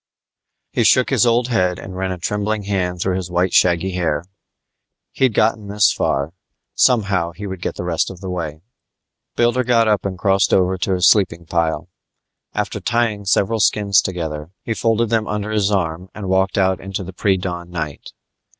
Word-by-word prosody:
He -, -, +1 dB
shook 130 Hz, +1 st, +4 dB
his 125 Hz, -3 st, +3 dB
old 120 Hz, +1 st, +2 dB
head 90 Hz, -7 st, +1 dB
and 95 Hz, -, -9 dB
ran 95 Hz, 0 st, -2 dB
a 90 Hz, -, -4 dB
trembling 105 Hz, +4 st, -2 dB
hand 90 Hz, -3 st, -2 dB
through 90 Hz, +1 st, 0 dB
his 90 Hz, -2 st, -5 dB
white 90 Hz, +1 st, 0 dB
shaggy 90 Hz, +1 st, +3 dB
hair. 85 Hz, -4 st, -1 dB, 0.9 s
He'd 130 Hz, -5 st, +1 dB
gotten 110 Hz, -1 st, +1 dB
this 105 Hz, +1 st, +3 dB
far; 70 Hz, +4 st, -1 dB, 0.4 s
somehow 100 Hz, -8 st, +2 dB
he 105 Hz, +4 st, -8 dB
would 95 Hz, -2 st, -6 dB
get -, -, -3 dB
the -, -, -5 dB
rest 85 Hz, -2 st, 0 dB
of 95 Hz, -, -10 dB
the 95 Hz, 0 st, -6 dB
way. 80 Hz, -4 st, -4 dB, 0.7 s
Builder 120 Hz, +2 st, +2 dB
got 115 Hz, -2 st, +3 dB
up 105 Hz, -2 st, +2 dB
and 95 Hz, -2 st, -4 dB
crossed 95 Hz, 0 st, +2 dB
over 95 Hz, 0 st, +2 dB
to 95 Hz, +1 st, -1 dB
his 90 Hz, -1 st, +4 dB
sleeping 85 Hz, -5 st, +3 dB
pile. 80 Hz, -1 st, -1 dB, 0.7 s
After -, -, -2 dB
tying 115 Hz, -4 st, 0 dB
several 100 Hz, +3 st, +1 dB
skins 100 Hz, -2 st, +3 dB
together, 80 Hz, -4 st, -4 dB
he 115 Hz, -, -2 dB
folded 115 Hz, 0 st, 0 dB
them 110 Hz, -2 st, +1 dB
under 105 Hz, 0 st, -3 dB
his 105 Hz, -2 st, +1 dB
arm 90 Hz, -2 st, -2 dB
and 105 Hz, -3 st, -6 dB
walked 95 Hz, +1 st, +1 dB
out 95 Hz, -1 st, +2 dB
into 95 Hz, +1 st, -5 dB
the 95 Hz, +1 st, -9 dB
pre 95 Hz, +1 st, +1 dB
dawn 85 Hz, -1 st, -5 dB
night. 80 Hz, -4 st, -6 dB
95 Hz, 185 wpm, -19 LUFS, 90-105 Hz, 0.9 s, shook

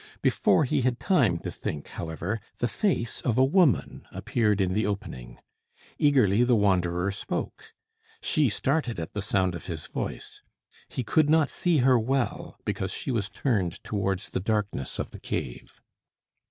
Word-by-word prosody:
Before -, -, +3 dB
he 130 Hz, -, +1 dB
had 125 Hz, -1 st, 0 dB
time 125 Hz, -, +3 dB
to -, -, -4 dB
think, 75 Hz, -1 st, -5 dB
however, 85 Hz, +7 st, -4 dB, 0.2 s
the 120 Hz, -, 0 dB
face 145 Hz, -, -1 dB
of 120 Hz, -2 st, 0 dB
a 130 Hz, -, +6 dB
woman 155 Hz, -, +2 dB
appeared 105 Hz, -4 st, 0 dB
in 95 Hz, -1 st, +1 dB
the 110 Hz, +3 st, +1 dB
opening. 80 Hz, -12 st, -5 dB, 0.6 s
Eagerly 125 Hz, -7 st, +4 dB
the 125 Hz, 0 st, +4 dB
wanderer 95 Hz, -3 st, +2 dB
spoke. 100 Hz, -, -5 dB, 0.4 s
She 150 Hz, -6 st, +2 dB
started 125 Hz, -, -1 dB
at 80 Hz, -, -6 dB
the 105 Hz, -, -2 dB
sound 95 Hz, -3 st, +1 dB
of 85 Hz, -, -8 dB
his 80 Hz, -4 st, -4 dB
voice. -, -, -5 dB, 0.5 s
He 130 Hz, -, -3 dB
could 150 Hz, +5 st, +3 dB
not 155 Hz, -2 st, +4 dB
see 175 Hz, -3 st, +1 dB
her 130 Hz, -2 st, +5 dB
well, 130 Hz, +2 st, -1 dB
because 95 Hz, -, -2 dB
she 135 Hz, -, -3 dB
was 105 Hz, -5 st, -1 dB
turned 100 Hz, -, 0 dB
towards 95 Hz, -3 st, -2 dB
the -, -, -1 dB
darkness 100 Hz, -, -2 dB
of -, -, -4 dB
the -, -, -10 dB
cave. -, -, -5 dB
110 Hz, 160 wpm, -27 LUFS, 95-130 Hz, 0.6 s, a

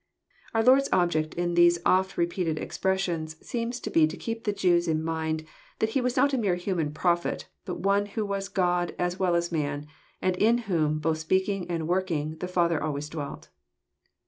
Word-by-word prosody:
Our 225 Hz, -, +3 dB
Lord's 265 Hz, +3 st, +5 dB
object 160 Hz, -4 st, +1 dB
in 175 Hz, 0 st, -1 dB
these 175 Hz, 0 st, +5 dB
often 190 Hz, +1 st, +3 dB
re 170 Hz, -, +4 dB
peated 170 Hz, -2 st, -2 dB
expressions 175 Hz, -5 st, -1 dB
seems 240 Hz, +1 st, -3 dB
to -, -, -5 dB
be 155 Hz, -1 st, +5 dB
to -, -, -7 dB
keep 230 Hz, +1 st, -5 dB
the 210 Hz, -, +2 dB
Jews 175 Hz, -3 st, +2 dB
in 160 Hz, -1 st, 0 dB
mind 160 Hz, -1 st, -2 dB, 0.3 s
that 220 Hz, -, +1 dB
He 265 Hz, -, +1 dB
was 250 Hz, +1 st, -1 dB
not 280 Hz, +2 st, +4 dB
a 265 Hz, -, +2 dB
mere 195 Hz, -6 st, +1 dB
human 175 Hz, -4 st, -2 dB
Prophet, 170 Hz, +2 st, 0 dB, 0.2 s
but 180 Hz, -2 st, -5 dB
one 200 Hz, +1 st, +2 dB
who 210 Hz, +1 st, -3 dB
was 195 Hz, -1 st, -3 dB
God 180 Hz, -2 st, 0 dB
as 180 Hz, +1 st, -1 dB
well 180 Hz, -2 st, +2 dB
as 170 Hz, 0 st, 0 dB
man, 145 Hz, -2 st, -2 dB, 0.3 s
and 185 Hz, -1 st, +1 dB
in 230 Hz, +4 st, +4 dB
whom, 155 Hz, -6 st, +1 dB
both 155 Hz, +1 st, 0 dB
speaking 190 Hz, +2 st, 0 dB
and 165 Hz, -2 st, -2 dB
working, 165 Hz, -4 st, -1 dB
the 180 Hz, -, -3 dB
Father 170 Hz, -3 st, +1 dB
always 150 Hz, -1 st, -3 dB
dwelt. 150 Hz, -3 st, -6 dB
175 Hz, 195 wpm, -27 LUFS, 160-195 Hz, 0.3 s, Lord's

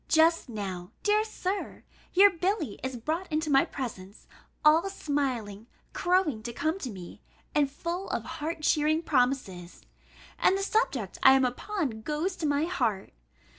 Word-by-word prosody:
Just 325 Hz, -2 st, +3 dB
now, 190 Hz, -5 st, -5 dB
dear 420 Hz, +1 st, +3 dB
Sir, 400 Hz, -2 st, -4 dB, 0.3 s
your 395 Hz, +2 st, +7 dB
Billy 355 Hz, -, -2 dB
is 260 Hz, -1 st, -4 dB
brought 320 Hz, +10 st, -3 dB
into 310 Hz, 0 st, 0 dB
my 270 Hz, 0 st, +5 dB
presence, 205 Hz, -6 st, -7 dB, 0.4 s
all 325 Hz, +5 st, +5 dB
smiling, 255 Hz, -, -3 dB, 0.3 s
crowing 350 Hz, -10 st, +1 dB
to 235 Hz, +2 st, -5 dB
come 315 Hz, +9 st, -1 dB
to 265 Hz, -, -4 dB
me, 185 Hz, -5 st, -10 dB, 0.3 s
and 290 Hz, -2 st, +3 dB
full 340 Hz, +7 st, -4 dB
of -, -, -2 dB
heart 310 Hz, +1 st, -5 dB
cheering 310 Hz, +2 st, +2 dB
promises; 245 Hz, -, -1 dB, 0.6 s
and 385 Hz, -, +4 dB
the 390 Hz, -, -2 dB
subject 285 Hz, -, -1 dB
I 265 Hz, -, +8 dB
am 265 Hz, -1 st, +4 dB
upon 255 Hz, -, -3 dB
goes 310 Hz, -, -2 dB
to 320 Hz, -, -1 dB
my 290 Hz, +2 st, +1 dB
heart. 220 Hz, -, -1 dB
295 Hz, 150 wpm, -28 LUFS, 235-350 Hz, 0.6 s, I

